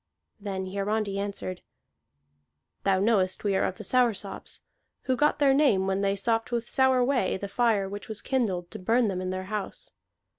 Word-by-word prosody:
Then 195 -2 -4
Hiarandi 200 +1 -2
answered: 200 -2 -4 1.2
"Thou 195 -1 +3
knowest 195 -3 +2
we 200 -2 +1
are - - +2
of 185 - -3
the 215 - -8
Soursops, 225 -3 0 0.4
who 260 - +1
got 295 +4 +2
their 280 -2 +4
name 270 -10 +3
when 195 0 0
they 200 0 +1
sopped 225 +3 0
with 235 -1 -1
sour 260 -2 +3
whey 250 -8 +1
the 200 - -5
fire 215 -2 +1
which 205 +3 -7
was 220 0 +1
kindled 195 -10 -1
to 215 - -7
burn 225 +4 +2
them 185 -1 -2
in 185 - -3
their 185 0 -3
house. 210 - -4
205 Hz, 180 wpm, -27 LUFS, 190-240 Hz, 1.2 s, their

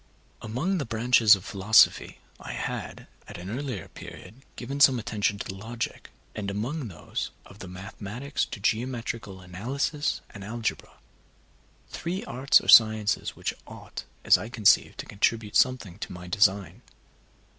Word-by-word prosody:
Among 155 - -1
the 145 - -2
branches 115 -1 +5
of 95 - -10
philosophy, 105 +1 +4 0.2
I - - -7
had, - - -5 0.2
at - - -9
an 90 +3 -7
earlier 125 -4 -4
period, 110 +8 -12
given 135 +3 -5
some 135 -3 +6
attention 105 -3 -1
to 100 - -5
logic, 115 +4 -6 0.2
and 100 -2 -4
among 120 +8 -3
those 85 -6 -5 0.2
of 100 - -15
the 95 - -8
mathematics 100 +9 -5
to 120 - -8
geometrical 115 -3 -2
analysis 125 - -2
and 100 -3 -10
algebra, 115 +2 -4 1.0
three 180 +3 -4
arts 130 +3 +4
or - - -11
sciences 110 -2 +5
which - - -3
ought, - - -9 0.2
as - - +6
I 110 - -6
conceived, 110 -4 +3
to - - -13
contribute 105 +1 -1
something 115 -8 +2
to - - -6
my 90 0 -9
design. 100 -2 +1
110 Hz, 145 wpm, -27 LUFS, 100-125 Hz, 1.0 s, some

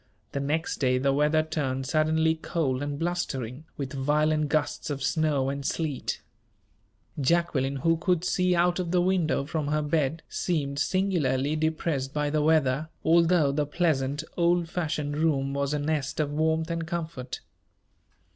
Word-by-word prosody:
The 140 - -2
next 150 +4 -1
day 130 -2 +2
the 135 +1 +2
weather 150 +2 +3
turned 135 -4 -2
suddenly 160 +2 +2
cold 155 -5 -2
and 145 0 -3
blustering, 145 -6 -3
with 140 -3 -4
violent 150 +2 +1
gusts 155 +1 -1
of 140 -2 -3
snow 145 -2 +1
and 140 0 -4
sleet. 150 -1 -2 1.0
Jacqueline, 140 -3 +1
who 165 +5 +2
could 175 0 +1
see 180 -1 +2
out 175 +1 +2
of 180 -2 -2
the 180 +1 +2
window 175 -6 +1
from 155 0 -2
her 150 +1 0
bed, 150 +1 0
seemed 145 -5 -2
singularly 155 -5 +1
depressed 155 -3 -1
by 150 -1 0
the 155 0 +1
weather, 155 -1 +2 0.2
although 170 -3 +4
the 145 +1 0
pleasant, 145 -3 0
old 170 0 +2
fashioned 150 -4 -2
room 140 -4 +1
was 140 0 -1
a 150 - 0
nest 150 -1 -2
of 150 -2 0
warmth 160 +2 +1
and 165 -1 -3
comfort. 160 -6 -5
155 Hz, 155 wpm, -27 LUFS, 140-165 Hz, 1.0 s, although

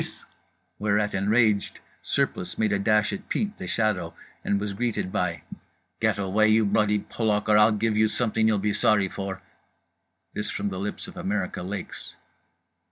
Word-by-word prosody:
_" - - -8 0.5
Whereat, 105 0 +1
enraged, 105 +1 +2 0.2
Surplice 90 -1 -1
made 110 -2 +1
a 100 - +1
dash 105 +1 +2
at 195 - -7
Pete 210 -1 -1
The - - -5
Shadow 95 -7 -1 0.3
and 100 - +1
was 100 0 -3
greeted 115 -3 -2
by 85 -3 -2 0.6
"Get - - +1
away, 100 +2 +2
you 110 0 +4
bloody 105 +1 +2
Polak, 105 -2 -1
or 105 - +5
I'll 105 +1 +6
give 110 +1 0
you 110 +1 +4
something 110 -1 +1
you'll 110 -1 +3
be 105 +1 0
sorry 100 -2 +2
for"—this 95 +2 -9
from 100 0 -2
the 95 -1 -5
lips 100 +2 -4
of - - -11
America 95 -2 -2
Lakes. 95 +3 -7
105 Hz, 165 wpm, -26 LUFS, 100-110 Hz, 0.6 s, I'll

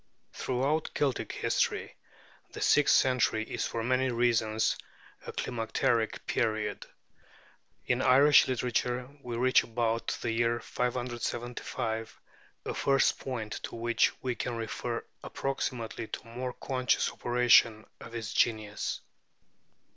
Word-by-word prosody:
Throughout 135 +5 -1
Celtic 140 -3 0
history, - - -1 0.6
the - - -7
sixth 150 -1 +5
century 125 -4 +2
is - - -3
for 115 - -3
many 130 +2 +1
reasons 115 -2 +2 0.5
a - - -4
climacteric 115 -1 -1
period. 110 -1 -1 1.0
In 125 +1 +1
Irish 140 +3 +6
literature, 125 0 -1
we 120 -3 -5
reach 130 +1 +5
about 115 -1 -1
the 115 - 0
year 115 +1 +1
575 120 -2 -3 0.5
a - - -2
first 135 0 +2
point 115 -5 -4
to - - -6
which 115 0 +2
we 125 -1 0
can 120 0 -3
refer 115 +1 -4 0.2
approximately 120 -5 -3
the - - -7
more 125 +2 -4
conscious 130 -1 0
operation 120 -2 +4
of 115 - -10
its 110 -4 -4
genius. 110 -3 0
120 Hz, 115 wpm, -30 LUFS, 115-125 Hz, 1.0 s, Irish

